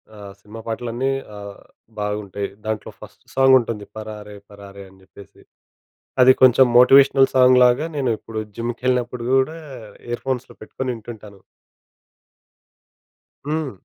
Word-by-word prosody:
ఆహ్, 100 -1 -11
సినిమా 105 +3 -12
పాటలన్నీ 120 +3 -3 0.3
ఆహ్, 100 -1 -10 0.4
బాగుంటాయి. 105 -1 -4 0.2
దాంట్లో 110 -1 -4
ఫస్ట్ - - -15
సాంగ్ 135 0 +5
ఉంటుంది. 110 -3 -5
పరారే 105 -1 -9 0.2
పరారే 100 -1 -12
అని 95 0 -22
జెప్పేసి. 100 0 -17 0.8
అది 130 +1 +8
కొంచెం 130 +1 +6
మోటివేషనల్ 135 +1 +6
సాంగ్‌లాగా 125 +2 +4
నేను 130 -4 -1
ఇప్పుడు 110 -1 -7 0.2
జిమ్‌కెళ్ళినప్పుడు 120 +1 -2
గూడా 135 +5 +1 0.5
ఇయర్ 120 0 -4
ఫోన్స్‌లో 130 -2 -4
పెట్టుకొని 130 +4 -5
వింటుంటాను. 110 -3 -12 2.1
హ్మ్. 155 -2 -2
120 Hz, 115 wpm, -20 LUFS, 105-130 Hz, 2.1 s, అది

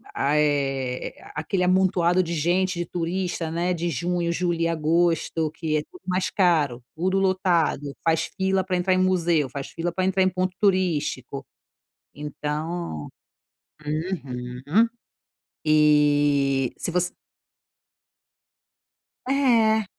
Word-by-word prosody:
ah, 140 +2 +1
eh, 135 -4 0 0.2
aquele 170 +5 -1
amontoado 180 -1 +3
de 170 - -4
gente, 180 +4 +1
de 175 - -1
turista, 175 0 -2
né, 175 +2 0
de 175 0 -2
junho, 175 0 -1
julho 170 -1 -1
e 165 - +2
agosto, 165 0 +1
que 155 -1 -1
é - - 0
tudo 365 - -15
mais 185 0 0
caro, 155 -10 +2
tudo 185 +4 +1
lotado. 175 -7 +1
Faz 160 -1 +1
fila 190 0 +1
para 185 0 -1
entrar 180 +1 +2
em - - +2
museu, 170 -6 +2
faz 135 +1 -6
fila 170 +1 -3
para 185 +2 -1
entrar 190 0 +1
em 185 - +3
ponto 185 0 -2
turístico, 160 - 0 0.7
então. 150 - -4 0.8
Uhum. 150 - -1 0.8
E, 145 -3 +3
se - - -3
você 180 +1 0 2.2
É. 230 -6 +3
170 Hz, 120 wpm, -24 LUFS, 150-185 Hz, 2.2 s, amontoado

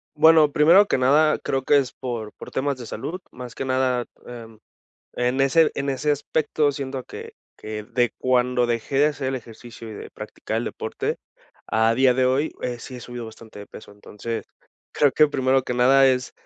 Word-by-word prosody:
Bueno, 155 -1 +6
primero 170 +8 +6
que - - 0
nada 150 +4 +3
creo 135 -1 -2
que 145 - +4
es 135 -3 0
por 120 -5 -6
por - - -11
temas 140 0 -1
de 120 - -8
salud, 160 - -6
más 125 -1 -10
que 135 - -4
nada, 130 -2 0 0.2
em, 115 -3 -10 0.5
en 125 +2 0
ese 160 +4 +4
en 140 0 -2
ese 140 +3 -1
aspecto 145 0 0
siento 135 -2 -5
que - - -10 0.2
que 110 0 -6
de 120 +2 0
cuando 125 -1 +1
dejé 120 +3 -2
de 145 - +5
hacer 145 -3 -4
el 135 - -2
ejercicio 115 -1 -10
y - - -8
de - - -9
practicar - - -6
el - - -1
deporte - - -4 0.5
a 110 +1 +2
día 130 0 +4
de 130 0 +2
hoy, 135 +5 +1
eh, 120 -1 -3
sí 125 +2 -9
he - - -9
subido 120 -1 -7
bastante 110 -1 -13
de 100 - -9
peso. 105 - -13
Entonces, 105 +2 -7 0.5
creo 145 -3 +3
que 150 - +4
primero 130 -2 +1
que 125 - -3
nada 135 +2 +5
es 130 0 -1
130 Hz, 195 wpm, -23 LUFS, 120-140 Hz, 0.5 s, Bueno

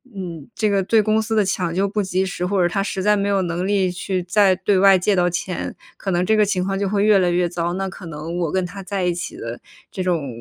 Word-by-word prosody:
嗯， 175 -4 -7
这 215 - +1
个 200 -1 +2
对 220 +4 +3
公 215 +1 +2
司 220 +1 -2
的 210 -2 +3
抢 180 -3 -1
救 195 +2 +1
不 210 +1 -1
及 190 -1 0
时， 180 -1 -4
或 190 0 +1
者 175 - +4
他 195 +3 -1
实 195 -1 -3
在 210 +1 +4
没 200 0 0
有 195 -2 +2
能 175 +1 -2
力 195 -3 +1
去 180 0 -3
再 190 +1 +3
对 195 0 +1
外 195 -1 +7
借 195 +3 +1
到 180 -1 +2
钱， 180 +1 -4 0.2
可 195 - -5
能 175 +1 +1
这 220 - +3
个 215 - +4
情 190 -3 0
况 195 0 -1
就 200 0 -1
会 205 +1 +1
越 210 -2 +5
来 180 -1 +2
越 175 0 +1
糟， 170 0 -2
那 195 +1 -2
可 185 -1 -9
能 160 +2 -6
我 170 -4 -1
跟 190 -1 0
他 195 +2 -8
在 190 0 -3
一 180 -1 +1
起 175 - -6
的 115 +1 -6 0.3
这 190 - -4
种 170 -6 0
190 Hz, 300 characters per minute, -21 LUFS, 175-200 Hz, 0.3 s, 外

